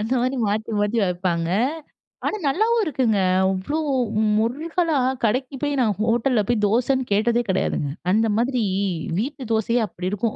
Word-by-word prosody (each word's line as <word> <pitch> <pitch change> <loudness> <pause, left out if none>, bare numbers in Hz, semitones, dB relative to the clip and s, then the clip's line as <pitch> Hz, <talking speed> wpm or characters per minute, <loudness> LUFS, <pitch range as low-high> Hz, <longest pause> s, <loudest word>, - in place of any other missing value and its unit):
அந்த 225 +5 -1
மாதிரி 255 +2 0
மாத்தி, 215 +2 -2
மாத்தி 205 +3 +1
வைப்பாங்க. 175 -2 -1 0.8
ஆனா 430 - -1
நல்லாவும் 440 +10 +2
இருக்குங்க. 255 - +1 0.3
அவ்ளோ 190 +12 -2 0.6
முறுகலா 310 +7 0 0.3
கடைக்கு 255 +4 0
போய் 290 -2 0
நான் 215 -5 +1
ஹோட்டல்ல 230 +1 +2
போய் 225 -3 +1
தோசன்னு 250 +4 +1
கேட்டதே 230 +4 +2
கெடையாதுங்க. 180 -6 0 0.2
அந்த 220 +3 +3
மாதிரி 245 +1 +1 0.6
வீட்டு 260 -1 -4
தோசையே 230 +2 +1
அப்டி 180 0 -5
இருக்கும். 210 +2 -1
235 Hz, 140 wpm, -22 LUFS, 210-270 Hz, 0.8 s, அந்த